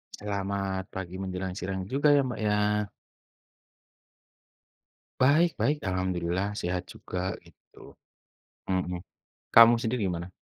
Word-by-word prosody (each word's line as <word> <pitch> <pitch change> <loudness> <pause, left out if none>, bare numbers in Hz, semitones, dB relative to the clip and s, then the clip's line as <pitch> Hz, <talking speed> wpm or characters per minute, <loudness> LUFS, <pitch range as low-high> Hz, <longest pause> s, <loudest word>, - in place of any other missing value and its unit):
Selamat 100 -1 -3
pagi 95 0 -7
menjelang 95 -1 -4
sirang 95 +1 -3
juga 145 +8 +3
ya, 140 - +5
Mbak, 125 -3 -4
ya. 105 0 +1 2.3
Baik, 155 +6 +5
baik, 150 +1 +2
alhamdulillah 95 +1 -1
sehat 90 0 -2
juga, 90 +1 -4
gitu. 85 - -17 0.7
Mhm. 90 -1 -1 0.5
Kamu 115 +1 +9
sendiri 115 +1 -2
gimana? 85 +1 -5
95 Hz, 105 wpm, -28 LUFS, 90-110 Hz, 2.3 s, Kamu